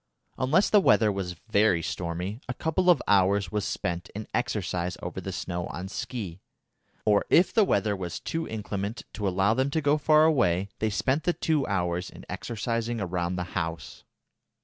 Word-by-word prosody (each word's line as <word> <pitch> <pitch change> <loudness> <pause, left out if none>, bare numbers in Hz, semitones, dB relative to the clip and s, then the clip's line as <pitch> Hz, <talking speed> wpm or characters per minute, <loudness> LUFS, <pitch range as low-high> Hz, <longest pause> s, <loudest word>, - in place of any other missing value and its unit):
Unless 155 +10 +3
the 210 - +7
weather 110 - +4
was 95 -3 -4 0.2
very 100 -6 +3
stormy, 90 - -4
a 120 - -2
couple 160 +6 +1
of 170 -7 +5
hours 100 0 +3
was 105 -2 -1
spent 90 0 -3
in 110 +1 -5
exercise 90 0 -1
over - - -5
the - - -5
snow 85 0 -4
on 95 +2 -6
ski, 100 -4 -5 0.7
or 105 -1 +4
if 175 +2 +5
the 220 - +5
weather 105 - +1
was 90 -3 -5
too 165 0 -3
inclement 105 0 -4
to 105 -2 -2
allow 95 +3 +2
them 130 +3 +1
to 160 - 0
go 145 0 +2
far 155 +1 +5
away, 100 - +2
they 110 - +1
spent 130 - 0
the 175 - +3
two 155 -5 0
hours 90 -2 -1
in - - -13
exercising 115 +1 -2
round 90 -2 -2
the 90 - -1
house. 80 -1 -4
105 Hz, 175 wpm, -27 LUFS, 90-130 Hz, 0.7 s, the